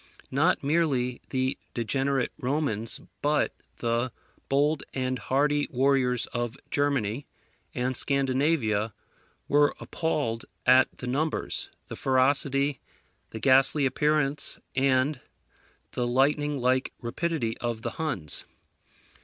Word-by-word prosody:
Not 150 +6 +2
merely 140 -5 +1
the 130 0 -1 0.2
degenerate 135 +2 0
Romans, 125 -5 -1 0.2
but 150 +1 +2 0.2
the 120 +1 0 0.4
bold 145 +2 +2
and 130 -1 -1
hardy 145 +2 +1
warriors 130 -2 +2
of 120 0 -2
Germany 140 -3 0 0.5
and 130 +1 -1
Scandinavia 130 -6 +1 0.5
were 145 0 +4
appalled 140 -8 -2 0.2
at 130 +1 +7
the - - -7
numbers, 145 +6 -1 0.2
the - - -6
ferocity, 140 +1 +2 0.5
the 110 - -7
ghastly 135 +4 +4
appearance, 150 0 +1 0.2
and 130 +1 +2 0.7
the 120 -1 -1
lightning 145 +4 +2
like 130 +1 +1
rapidity 120 -1 -2
of 120 -2 -3
the 120 - -2
Huns. 105 - -3
135 Hz, 105 wpm, -27 LUFS, 125-145 Hz, 0.7 s, at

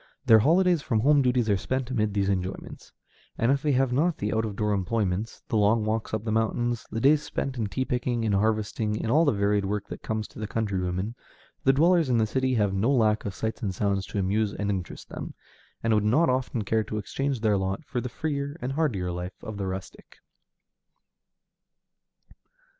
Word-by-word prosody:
Their 110 -1 +7
holidays 175 - +3
from 115 -6 0
home 145 +3 +5
duties 125 -3 +2
are 100 -2 +3
spent 130 +5 -3
amid 105 -4 0
these 100 -1 +1
enjoyments; 95 -1 -4 0.5
and 115 +3 +2
if 140 0 +1
they 150 -1 +1
have 130 -1 +2
not 155 +4 +2
the 105 - -2
out 110 0 +1
of 105 -2 -5
door 105 0 0
employments, 100 +1 -1
the 110 - 0
long 105 +1 +3
walks 110 +1 -2
up 110 -1 -2
the 110 - -1
mountains, 115 +2 0
the 115 - -3
days 145 +5 +4
spent 140 -3 -3
in 110 -4 -1
tea 130 +6 -2
picking, 120 -2 -1
in 110 - +1
harvesting, 105 +1 0
in 110 +1 -2
all 160 +5 +5
the 145 - +4
varied 100 0 +1
work 105 +1 -2
that - - -7
comes 110 -1 -3
to - - -12
the 110 - -3
country 105 -4 -1
woman, 90 +4 -2 0.5
the 135 - +7
dwellers 165 +2 +3
in 120 - +3
the 110 - +3
city 130 +3 0
have 105 -3 +1
no 100 +6 +1
lack 110 -5 +2
of 100 -2 -4
sights 110 0 -3
and 95 -4 -2
sounds 100 -1 0
to - - -5
amuse 100 +2 0
and 100 -1 -1
interest 95 -3 -5
them, - - -7 0.5
and 115 -1 +2
would 105 -1 +3
not 130 +9 +3
often 125 -3 -1
care 110 +2 +1
to 105 - -5
exchange 135 +4 -2
their 110 -2 +3
lot 95 +10 -2
for 125 -4 -3
the 125 - -4
freer 145 +2 -3
and 130 -1 -3
hardier 125 - 0
life 90 +1 -6
of 110 -3 -6
the 100 -1 -3
rustic. 95 +1 -8
110 Hz, 210 wpm, -26 LUFS, 100-130 Hz, 0.5 s, Their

